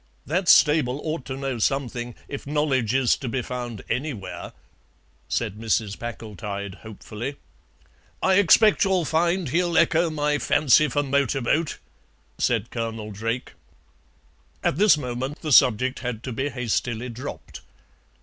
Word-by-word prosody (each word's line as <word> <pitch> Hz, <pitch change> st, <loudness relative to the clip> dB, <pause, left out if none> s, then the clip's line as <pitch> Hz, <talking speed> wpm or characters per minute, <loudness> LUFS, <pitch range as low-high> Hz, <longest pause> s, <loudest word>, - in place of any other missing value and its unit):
"That 175 Hz, +4 st, 0 dB
stable 150 Hz, -4 st, +5 dB
ought 155 Hz, -4 st, -3 dB
to 130 Hz, -, -5 dB
know 135 Hz, -3 st, -3 dB
something, 120 Hz, -1 st, -1 dB
if 140 Hz, 0 st, -7 dB
knowledge 135 Hz, -6 st, +1 dB
is 130 Hz, -3 st, +3 dB
to 130 Hz, -, -5 dB
be 125 Hz, +1 st, -2 dB
found 120 Hz, -4 st, -6 dB
anywhere," 125 Hz, -9 st, -4 dB, 0.8 s
said 105 Hz, -, -2 dB
Mrs. 110 Hz, -2 st, -1 dB
Packletide 105 Hz, -4 st, -6 dB
hopefully. 110 Hz, +4 st, -7 dB, 0.8 s
"I 190 Hz, +1 st, +3 dB
expect 205 Hz, +3 st, +5 dB
you'll 190 Hz, -4 st, +1 dB
find 170 Hz, +1 st, +1 dB
he'll 170 Hz, +3 st, +1 dB
echo 165 Hz, +1 st, +3 dB
my 150 Hz, -1 st, 0 dB
fancy 150 Hz, +1 st, +4 dB
for 145 Hz, 0 st, 0 dB
Motorboat," 140 Hz, +2 st, 0 dB, 0.6 s
said 115 Hz, -2 st, 0 dB
Colonel 115 Hz, -2 st, -4 dB
Drake. 115 Hz, +4 st, -4 dB, 1.1 s
At -, -, +1 dB
this 205 Hz, -4 st, +5 dB
moment 130 Hz, +1 st, -4 dB
the 155 Hz, -, -2 dB
subject 130 Hz, 0 st, +4 dB
had 120 Hz, -3 st, -5 dB
to 130 Hz, -, -4 dB
be 135 Hz, +5 st, -2 dB
hastily 125 Hz, -1 st, -2 dB
dropped. 125 Hz, +4 st, -8 dB
130 Hz, 130 wpm, -24 LUFS, 115-150 Hz, 1.1 s, stable